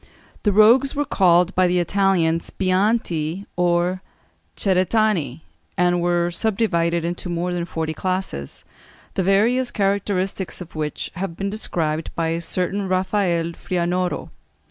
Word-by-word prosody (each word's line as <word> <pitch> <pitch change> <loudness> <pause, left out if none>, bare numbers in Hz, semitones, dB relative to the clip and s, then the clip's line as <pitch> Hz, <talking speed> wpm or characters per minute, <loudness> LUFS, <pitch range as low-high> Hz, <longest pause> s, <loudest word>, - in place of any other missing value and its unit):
The 210 - +2
rogues 235 +7 +5
were 290 +1 0
called 180 -6 +3
by 185 0 +3
the 180 0 +1
Italians 175 -2 +1
bianti, 185 -3 0
or 175 +1 +1 0.6
ceretani, 185 - +1 0.4
and 175 0 +2
were 175 0 +1
subdivided 170 -5 0
into 175 +1 -4
more 175 +1 -2
than 175 -1 -2
forty 160 -2 -3
classes, 185 - -4 0.5
the - - 0
various 225 +7 +2
characteristics 195 -1 -1
of 180 -3 -9
which 150 -2 -4
have 180 -2 -4
been 195 0 -2
described 165 -7 -2
by 165 -1 0
a 165 +1 -1
certain 190 +3 -1
Rafael 185 -3 0
Frianoro. 175 -1 -2
180 Hz, 125 wpm, -22 LUFS, 170-195 Hz, 0.6 s, rogues